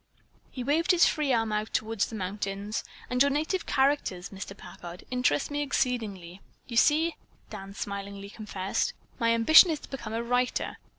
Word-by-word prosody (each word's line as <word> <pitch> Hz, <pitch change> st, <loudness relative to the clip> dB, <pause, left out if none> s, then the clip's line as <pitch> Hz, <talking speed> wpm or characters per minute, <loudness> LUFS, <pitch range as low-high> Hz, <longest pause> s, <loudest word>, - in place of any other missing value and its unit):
He 250 Hz, -, -6 dB
waved 305 Hz, +6 st, +1 dB
his 360 Hz, -2 st, +6 dB
free 300 Hz, -4 st, +1 dB
arm 225 Hz, -3 st, +1 dB
out 210 Hz, +1 st, -2 dB
toward 220 Hz, 0 st, -2 dB
the 220 Hz, -, 0 dB
mountains. 200 Hz, +1 st, -3 dB, 0.2 s
"And 250 Hz, 0 st, 0 dB
your 280 Hz, -, +6 dB
native 310 Hz, +6 st, -1 dB
characters, 265 Hz, -10 st, +1 dB
Mr. 195 Hz, 0 st, -8 dB
Packard, 175 Hz, -2 st, -10 dB
interest 250 Hz, -, +1 dB
me 290 Hz, 0 st, -1 dB
exceedingly. 210 Hz, -10 st, -2 dB, 0.3 s
You 235 Hz, -, -4 dB
see," 315 Hz, +5 st, +4 dB, 0.3 s
Dan 195 Hz, -2 st, -8 dB
smilingly 200 Hz, 0 st, -6 dB
confessed, 200 Hz, -3 st, -2 dB, 0.3 s
"my 230 Hz, -1 st, +2 dB
ambition 315 Hz, +10 st, +8 dB
is 310 Hz, -2 st, -1 dB
to -, -, -12 dB
become 235 Hz, -5 st, -6 dB
a 230 Hz, +1 st, -1 dB
writer. 245 Hz, +1 st, 0 dB
225 Hz, 165 wpm, -28 LUFS, 200-275 Hz, 0.3 s, ambition